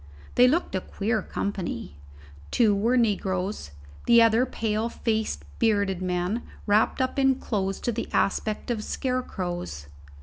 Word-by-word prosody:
They 250 - +6
looked 320 - +1
a 190 - 0
queer 215 +3 -1
company: 185 - -4 0.5
two 220 -4 +3
were 230 +5 +2
negroes, 195 - 0 0.4
the 235 0 +7
others 230 +2 +5
pale 220 0 -1
faced 220 -2 -2
bearded 200 -5 +2
men, 180 +5 -1 0.2
wrapped 210 +1 +3
up 260 +2 -2
in 270 -1 +4
clothes 195 -6 -2
to 240 - 0
the 230 +1 -4
aspect 215 +4 0
of 220 -3 -2
scarecrows. 175 - -3
215 Hz, 135 wpm, -26 LUFS, 190-235 Hz, 0.5 s, the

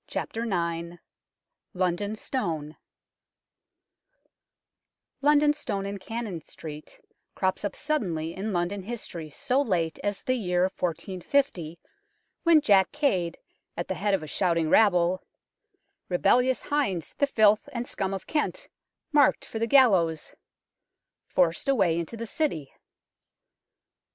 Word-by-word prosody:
IX - - -4 1.4
LONDON 185 +3 0
STONE 160 - -3 2.5
LONDON 295 +1 +5
Stone 195 -9 -4
in 200 0 -5
Cannon 215 -4 -5
Street 150 0 -10 0.4
crops 190 +1 -1
up 205 - -3
suddenly 175 - -2
in 205 +3 -3
London 180 +2 -1
history 185 -7 -6
so 250 - 0
late 170 - -1
as 205 -1 -2
the 255 - +1
year 180 -7 +1
1450, 180 - -1 0.6
when 335 -3 +5
Jack 195 -7 +4
Cade, 190 - 0 0.4
at 170 - -3
the - - -1
head 200 +1 +1
of 180 - -4
a - - -7
shouting 165 -1 +1
rabble 180 -4 +4 0.5
" - - -49
Rebellious 245 +8 +3
hinds, 200 - -1
the 285 - +3
filth 215 +2 +3
and 240 -2 -4
scum 195 -1 -2
of 195 -1 -5
Kent, 405 +11 -2 0.4
Mark'd 295 -1 +4
for 225 - -6
the 230 - 0
gallows 190 - +4 0.5
" - - -60
forced 175 +7 +2
a 275 - +4
way 175 -7 +2
into 170 +7 -5
the 230 - -4
City. 215 - -2
195 Hz, 125 wpm, -27 LUFS, 170-245 Hz, 2.5 s, LONDON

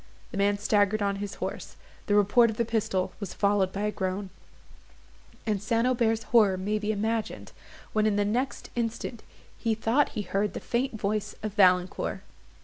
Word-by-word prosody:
The - - -5
man 200 +1 +2
staggered 205 0 +2
on 200 0 0
his 200 0 -5
horse, - - -5 0.3
the 205 - +3
report 210 +4 +5
of 220 - -5
the 235 - +1
pistol 220 -5 -1
was 200 -4 -6
followed 200 -2 +2
by 200 - -4
a 210 - +1
groan, 190 -1 -3 1.1
and 210 -3 0
St. 230 +2 +1
Aubert's 230 -3 +2
horror 210 -6 +4
may 205 +3 -1
be 210 +1 -1
imagined, 220 +1 -2 0.4
when 215 0 +3
in 210 - +2
the 205 0 +2
next 245 +6 -2
instant 230 0 -3 0.4
he 225 -2 +1
thought 230 +6 +2
he 210 - -1
heard 195 +2 -1
the - - -2
faint 240 -2 -2
voice 210 +1 -2
of 215 -2 -3
Valancourt. 185 -3 +2
210 Hz, 175 wpm, -28 LUFS, 200-225 Hz, 1.1 s, report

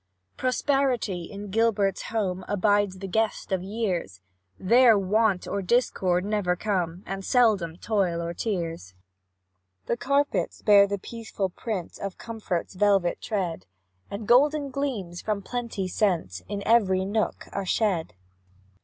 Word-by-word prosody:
Prosperity, 255 - 0
in 200 +1 -8
Gilbert's 205 -3 +1
home, 190 -5 -1
Abides 205 -1 +2
the 195 +1 -6
guest 220 +2 -1
of 190 -2 +1
years; 185 - -3 0.4
There 235 +3 +5
Want 200 0 +1
or 200 - -2
Discord 185 -4 +1
never 205 -4 0
come, 180 -3 -2
And 195 0 -5
seldom 200 -9 +2
Toil 190 -5 0
or 170 0 -3
Tears. 165 - -4 0.9
The - - 0
carpets 280 +4 0
bear 200 -1 +7
the 200 0 -2
peaceful 220 -2 -4
print 195 -4 -5
Of 195 -2 -5
comfort's 220 -8 -4
velvet 195 -2 +2
tread, 180 - -3 0.4
And 205 +1 -6
golden 285 +3 +4
gleams, 230 -11 -3
from 210 -2 -2
plenty 235 -6 -3
sent, 170 - 0
In 200 0 -3
every 190 -5 +3
nook 210 +2 -1
are 200 - -2
shed. 180 - 0
200 Hz, 130 wpm, -26 LUFS, 180-225 Hz, 0.9 s, bear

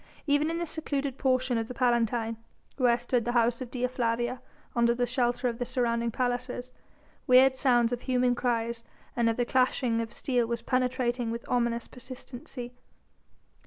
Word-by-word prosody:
Even 290 +1 +2
in 330 - -2
this 340 -2 -3
secluded 280 -4 -2
portion 255 -2 +2
of 225 - -3
the 250 - -7
Palatine, 235 -2 +1 0.4
where 245 -3 +4
stood 240 0 0
the 240 +2 -2
house 235 +1 +2
of 255 - -5
Dea 250 0 -1
Flavia 240 0 -1 0.3
under 235 0 +3
the 245 0 +1
shelter 245 0 0
of 235 0 -3
the - - 0
surrounding 235 -2 0
palaces, 245 +1 -2 0.5
weird 260 +1 +6
sounds 240 -3 +3
of 245 - -3
human 250 -1 +2
cries 235 -1 -1 0.3
and 235 -1 +2
of 225 - -1
the 245 - +1
clashing 250 -2 +2
of 225 0 -5
steel 245 -3 0
was 235 0 -3
penetrating 250 -2 0
with 230 +1 -5
ominous 235 -1 0
persistency. 245 0 -9
245 Hz, 165 wpm, -28 LUFS, 235-255 Hz, 0.5 s, weird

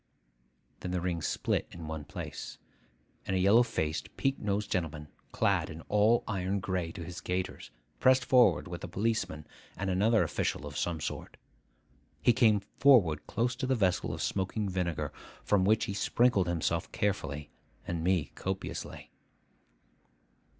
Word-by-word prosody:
Then 90 - -5
the 90 0 -1
ring 85 -1 -2
split - - -1
in 85 -2 -8
one 80 -2 -5
place; - - -7 0.7
and 95 - 0
a - - +2
yellow 100 +6 +6
faced, 80 -10 -2
peak 135 0 0
nosed 105 0 -2
gentleman, 80 -5 -2 0.2
clad - - +1 0.2
all 105 +3 +4
in - - -27
iron 95 +1 -1
gray 90 -3 -2
to 85 - -7
his 85 +1 -7
gaiters, 90 0 -3 0.3
pressed 130 0 +4
forward 125 -6 +4
with 85 -2 -7
a - - -4
policeman 95 -5 -1 0.3
and 95 0 -1
another 105 +4 +3
official - - -2
of - - -8
some 85 -3 -2
sort. - - -5 0.8
He 120 - +4
came 110 -4 +4 0.2
forward 115 - +5
close 120 +1 0
to 130 0 -2
the 130 - +2
vessel 95 -6 +1
of - - -4
smoking 100 +2 -1
vinegar; 90 -3 -2 0.3
from 100 -3 +3
which 110 +2 +3
he 100 - -4
sprinkled 105 -2 +2
himself 85 -1 -1
carefully, 75 -8 -2 0.3
and 85 -2 -3
me 90 -4 +1
copiously. 95 0 -5
95 Hz, 150 wpm, -30 LUFS, 85-110 Hz, 0.8 s, yellow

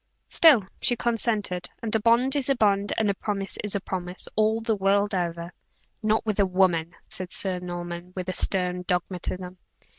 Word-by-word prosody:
"Still 295 -11 +6 0.2
she 245 - +5
consented; 220 -6 -1
and 220 - -2
a 220 - +3
bond 235 +5 +3
is 280 -2 +1
a 275 - +3
bond, 205 -3 +2
and 220 - +2
a 200 - +2
promise 195 -1 -4 0.2
a - - +1
promise, 180 -1 -5
all 215 +1 +2
the 225 -1 0
world 200 +1 +1
over." 170 -1 -3 0.5
"Not 220 0 +1
with 215 -2 -1
a 200 - +5
woman," 180 -3 +1
said 185 -1 -6
Sir 185 -2 -1
Norman, 175 0 -6
with 185 0 -3
stern 180 -1 +1
dogmatism. 180 0 -3
195 Hz, 170 wpm, -25 LUFS, 180-220 Hz, 0.5 s, Still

